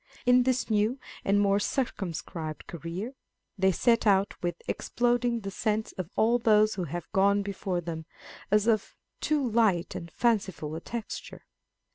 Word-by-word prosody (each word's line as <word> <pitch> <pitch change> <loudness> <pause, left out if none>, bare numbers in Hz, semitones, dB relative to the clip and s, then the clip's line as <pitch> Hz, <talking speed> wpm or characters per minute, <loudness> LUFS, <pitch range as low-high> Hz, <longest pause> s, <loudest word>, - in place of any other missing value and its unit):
In 250 0 +6
this 255 0 +1
new 215 +3 +1 0.3
and 200 +1 +3
more 200 0 +3
circumscribed 170 - -3
career, 170 - -5 0.4
they 190 -1 +3
set 230 +5 +2
out 195 -1 +4
with 175 -1 -1
exploding 240 -1 0
the 195 -1 -5
sense 215 +2 -1
of 185 -3 -6
all 235 +2 +3
those 215 -2 +4
who 185 -2 -3
have 170 +2 -5
gone 200 +1 +3
before 195 -2 -2
them, 160 -1 -6 0.4
as 210 +1 +3
of 220 -3 +1 0.2
too 295 -4 +1
light 215 -7 +2
and 170 - -6
fanciful 190 -8 0
a - - -3
texture. 235 +2 -7
205 Hz, 150 wpm, -28 LUFS, 175-230 Hz, 0.4 s, In